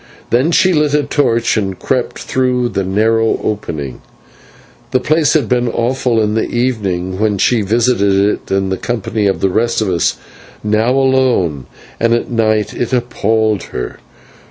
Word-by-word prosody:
Then 125 +7 +3
she 185 +2 +3
lit 150 -2 +2
a 150 - +2
torch 120 -5 +1
and 95 -3 -2
crept 130 -2 -2
through 125 -2 0
the 100 - -2
narrow 110 +4 +1
opening. 75 - -4 0.9
The 130 - +1
place 155 +4 +2
had 150 -8 +1
been 125 +1 +1
awful 120 0 0
in 105 -1 +1
the 110 - -1
evening 100 -7 -2
when 105 -2 +1
she 115 +4 +2
visited 105 -1 +2
it 100 +1 0
in 95 0 +1
the 95 - -1
company 110 -2 -2
of 95 - -1
the 95 - +2
rest 115 +4 +1
of 110 -3 0
us. 85 - 0 0.5
Now, 105 +2 +1
alone 130 - +1 0.3
and 115 0 +3
at 120 - -3
night, 110 -2 +1
it 120 - -3
appalled 110 -4 0
her. 60 - -6
115 Hz, 160 wpm, -15 LUFS, 100-125 Hz, 0.9 s, Then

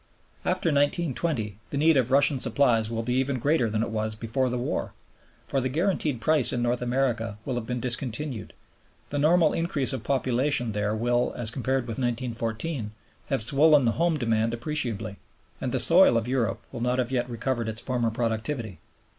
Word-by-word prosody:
After 165 - 0
1920 145 - 0
the 140 - -4
need 160 +2 +4
of 130 -3 +2
Russian 140 0 +4
supplies 120 -3 +2
will 115 0 -3
be 125 +2 -1
even 130 +1 0
greater 135 -2 +1
than 110 +1 0
it 115 - -4
was 110 0 -2
before 115 +4 -1
the 125 - -2
war; 120 - -3 0.5
for 135 - 0
the 130 - -1
guaranteed 155 - 0
price 155 -1 +2
in 120 - -1
North 120 +1 0
America 120 -4 -1
will 130 - -2
have 120 -2 -4
been 125 0 -2
discontinued, 125 0 -1 0.6
the 145 - -1
normal 160 +2 +4
increase 150 -6 -1
of 130 - -3
population 130 0 0
there 105 +1 -1
will, 120 +2 0
as 115 -2 0
compared 130 +1 -1
with 115 -1 -5
1914, 115 0 -3 0.3
have 135 -5 +1
swollen 145 +2 +5
the 115 - +3
home 165 +3 +1
demand 115 -2 0
appreciably, 115 -6 -3 0.4
and 125 - -2
the 130 - 0
soil 170 -4 +6
of 115 0 -1
Europe 120 -6 -1
will 115 - -6
not 125 +1 0
yet 120 -2 0
have 125 - -11
recovered 120 -1 -2
its 110 0 -1
former 120 -2 -1
productivity. 115 - -3
125 Hz, 180 wpm, -26 LUFS, 115-140 Hz, 0.6 s, soil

